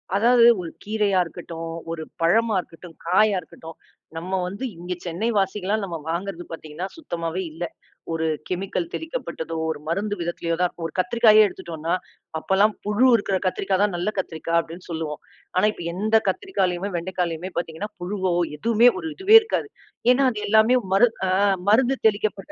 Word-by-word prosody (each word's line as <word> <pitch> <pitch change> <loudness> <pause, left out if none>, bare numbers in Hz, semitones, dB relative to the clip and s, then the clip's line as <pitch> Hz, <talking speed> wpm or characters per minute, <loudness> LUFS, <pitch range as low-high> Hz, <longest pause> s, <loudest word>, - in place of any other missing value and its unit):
அதாவது 235 +2 +6
ஒரு 165 -2 -6
கீரையா 205 -2 +1
இருக்கட்டும், 165 0 -7 0.2
ஒரு 160 -1 -4 0.2
பழமா 220 +6 +3
இருக்கட்டும், 165 -1 -14
காயா 200 +4 +4
இருக்கட்டும். 160 0 -12 0.4
நம்ம 185 +3 -2
வந்து 200 +7 -6
இங்க 175 +2 -4
சென்னை 175 +6 -2
வாசிகளெல்லா 195 +1 0
நாம 175 -4 -4
வாங்குறது 175 0 -3
பாத்தீங்கன்னா, 160 +3 -6
சுத்தமாவே 170 - -4
இல்ல. 165 +3 -6 0.5
ஒரு 165 0 -1 0.2
கெமிக்கல் 180 -1 -2
தெளிக்கப்பட்டதோ, 255 - -5
ஒரு 160 - -3
மருந்து 205 +5 -1
விதத்திலோ 170 0 -2
தான் 180 - +3
இருக்கும். 170 - -8
ஒரு 155 - -13
கத்திரிக்காயே 215 +3 +5
எடுத்துட்டோனா, 165 -3 -4 0.5
அப்பல்லாம் 200 +5 +3
புழு 210 +5 +3
இருக்கிற 200 -3 0
கத்திரிக்காய் 190 +1 0
தான் 205 -3 +1
நல்ல 180 +4 -1
கத்திரிக்காய் 165 -2 -1
அப்டின்னு 165 +2 -7
சொல்லுவோம். 160 -2 -4 0.4
ஆனா 185 - +4
இப்ப 175 - -9
எந்தக் 220 +4 +2
கத்திரிக்காய்ளையுமே, 190 - -1
வெண்டைக்காளையுமே 175 0 -3
பார்த்தீங்கன்னா, 170 +4 -3
புழுவோ 185 -1 -1 0.2
எதுவுமே 230 +6 +5
ஒரு - - -5
இதுவே 390 +3 +5
இருக்காது. 435 -1 -2 0.4
ஏன்னா 270 +2 +3
அது 210 - -5
எல்லாமே 220 +4 +5 0.2
மருந்து 225 +4 +4
அ - - 0 0.4
மருந்து 255 +5 +4
தெளிக்கப்பட்ட, 205 -2 -1
190 Hz, 150 wpm, -23 LUFS, 170-215 Hz, 0.5 s, அதாவது